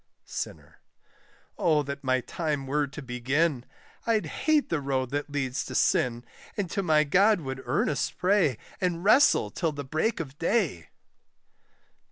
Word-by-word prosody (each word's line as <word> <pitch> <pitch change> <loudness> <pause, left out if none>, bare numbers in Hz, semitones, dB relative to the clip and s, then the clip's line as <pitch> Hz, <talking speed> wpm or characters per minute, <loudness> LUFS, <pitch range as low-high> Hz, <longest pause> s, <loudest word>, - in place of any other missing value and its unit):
SINNER. - - -7 0.8
Oh 155 -4 +3
that 140 0 -6
my 130 -1 +1
time 150 -1 -3
were 145 +2 0
to 140 +1 -9
begin! 130 +3 0 0.4
I'd 225 -2 +2
hate 305 0 +1
the 165 -3 0
road 130 -2 -1
that 145 +1 -2
leads 135 -3 -2
to - - -7
sin, 120 -1 +2 0.3
And 195 -5 -2
to 200 - 0
my 155 -4 +4
God 195 +6 +4
would 130 -2 -5
earnest 135 +1 0
pray, 180 - +2 0.2
And 175 -2 -1
wrestle 265 +8 +5
till 165 -4 -1
the 145 0 -5
break 160 - 0
of 145 -3 -7
day. 165 - 0
150 Hz, 150 wpm, -27 LUFS, 130-180 Hz, 0.8 s, wrestle